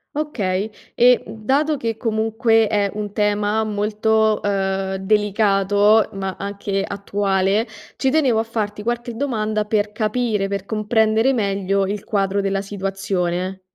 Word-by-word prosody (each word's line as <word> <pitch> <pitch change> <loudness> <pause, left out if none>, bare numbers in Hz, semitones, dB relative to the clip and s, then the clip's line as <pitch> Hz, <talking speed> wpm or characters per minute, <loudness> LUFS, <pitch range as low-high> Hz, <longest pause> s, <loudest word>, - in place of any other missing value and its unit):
Okay 210 -9 -2 0.2
e, 245 +1 +5
mhmm, 215 0 -11
dato 295 +3 +2
che 230 -4 -2
comunque 225 0 +1
è 205 -1 +1
un 205 -1 -4
tema 210 +1 +1
molto, 215 +1 +1
ehm, 195 -1 -1
delicato 205 +1 +3
ma 195 -1 -4
anche 200 0 -3
attuale, 200 +1 0 0.3
ci 265 - +1
tenevo 260 -7 +2
a - - +1
farti 210 -2 -3
qualche 240 +1 -3
domanda 215 -5 -1
per 210 -1 0
capire, 215 -1 -1
per 200 -1 -4
comprendere 220 +3 +2
meglio 195 -3 0
il 205 +1 -4
quadro 200 -1 0
della 195 0 -1
situazione. 190 -2 -3
210 Hz, 130 wpm, -21 LUFS, 195-220 Hz, 0.3 s, e